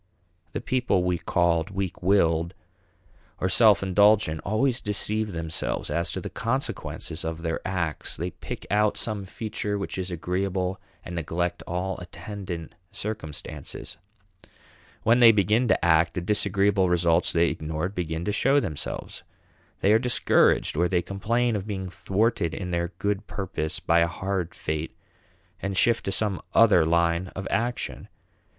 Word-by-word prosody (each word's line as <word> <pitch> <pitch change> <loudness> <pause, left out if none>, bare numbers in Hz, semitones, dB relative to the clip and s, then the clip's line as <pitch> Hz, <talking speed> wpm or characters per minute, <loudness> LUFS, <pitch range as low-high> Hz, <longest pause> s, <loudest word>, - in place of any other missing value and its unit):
The - - -3
people 125 -8 +1
we 90 -1 0
called 85 -2 +1
weak 95 -2 -4
willed 85 -2 +2 0.8
or 95 - +1
self 100 +1 +5
indulgent 100 -4 +3
always 120 +5 +1
deceive 105 +1 0
themselves 80 -2 -3
as 85 0 +1
to - - -2
the - - -6
consequences 115 - -3
of 80 0 -4
their 80 -1 -1
acts. 90 -5 -3
They 90 +2 -3
pick - - -8
out 105 0 +2
some 105 -3 -3
feature 105 +1 -3
which 100 -1 -4
is 95 0 -3
agreeable 90 +2 -2 0.2
and 90 - -7
neglect 85 +1 -2
all 90 +2 -2
attendant 90 -1 -7 0.2
circumstances. 100 -8 -6 1.1
When 115 +2 +4
they 115 -2 +9
begin 105 +4 +2
to 110 - +2
act, 80 +1 +4
the 90 - -1
disagreeable 100 0 +2
results 85 -1 +2
they 85 0 +3
ignored 80 +4 -3
begin 85 -2 -3
to 105 - 0
show 135 +7 +3
themselves. 75 - -5 0.6
They 100 - +4
are 110 - +5
discouraged, 125 - +3
or 85 +3 +2
complain 105 +6 0
of 100 0 -4
being 95 -3 -3
thwarted 95 -3 0
in 90 -2 -4
their 85 0 0
good 100 +1 -2
purpose 85 -5 -3
by 85 +1 +3
a 85 - +4
hard 90 +1 -3
fate, 80 +1 -4 0.6
and 95 0 -3
shift 115 +3 +3
to 95 - -1
some 100 -2 0
other 105 -8 +6
line 85 +2 +2
of 95 +1 -4
action. 120 +2 -2
95 Hz, 145 wpm, -26 LUFS, 85-105 Hz, 1.1 s, they